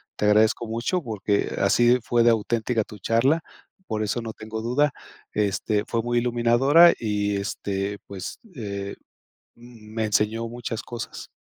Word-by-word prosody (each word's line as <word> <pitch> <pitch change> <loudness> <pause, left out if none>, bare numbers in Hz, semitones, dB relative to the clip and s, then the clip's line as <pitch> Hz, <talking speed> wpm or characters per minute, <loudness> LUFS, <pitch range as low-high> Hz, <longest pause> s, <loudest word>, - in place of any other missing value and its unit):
te - - -1
agradezco 110 +2 +3
mucho, 115 +11 -1
porque 105 -3 -1
así 120 +1 +4
fue 120 -1 +2
de 120 - +6
auténtica 115 +1 0
tu 105 - -12
charla. 130 - +2 0.5
Por 110 -1 -1
eso 105 +3 -1
no 115 -1 -6
tengo 110 0 -6
duda. 140 +6 +2 0.4
Este, 105 +1 0
fue 115 - 0
muy 120 0 +1
iluminadora 125 +8 +5
y, 105 -2 -1
este 100 0 -3
pues, 95 -2 -7 0.2
eh, 100 -4 -5 0.6
mm, 115 -3 -15
me 110 -1 0
enseñó 110 +2 0
muchas 115 -1 -5
cosas. 120 -2 -7
115 Hz, 145 wpm, -24 LUFS, 105-120 Hz, 0.6 s, de